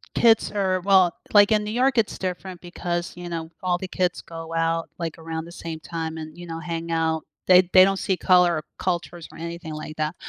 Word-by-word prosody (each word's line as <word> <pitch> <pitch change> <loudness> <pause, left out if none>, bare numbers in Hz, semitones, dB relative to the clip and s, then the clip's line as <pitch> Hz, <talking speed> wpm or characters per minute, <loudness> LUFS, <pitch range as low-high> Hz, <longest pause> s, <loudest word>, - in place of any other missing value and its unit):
kids 225 -2 +4
are 190 -3 0
well, 190 -2 +4 0.2
like, 205 0 +7
in 210 -1 +3
New 210 - -4
York, 255 +2 +2
it's 220 - +1
different 185 0 -5
because, 175 0 -4
you 175 0 -7
know, 165 -1 -5
all 180 -1 +1
the 190 - -6
kids 180 -1 -1
go 165 0 -8
out, 165 0 0
like, 165 -2 -4
around 160 0 -5
the 170 - -11
same 165 -2 -7
time 160 0 -5
and, 155 +1 -8
you 175 0 -9
know, 165 0 -5
hang 165 0 -4
out. 160 -1 0 0.2
They 180 0 +8
they 185 - +9
don't 195 0 +2
see 190 - 0
color, 180 -3 +4
or 155 - -5
cultures, 175 -2 -3
or - - -13
anything 170 -1 -6
like 155 0 -7
that, 155 +2 -1
175 Hz, 220 wpm, -24 LUFS, 165-185 Hz, 0.2 s, they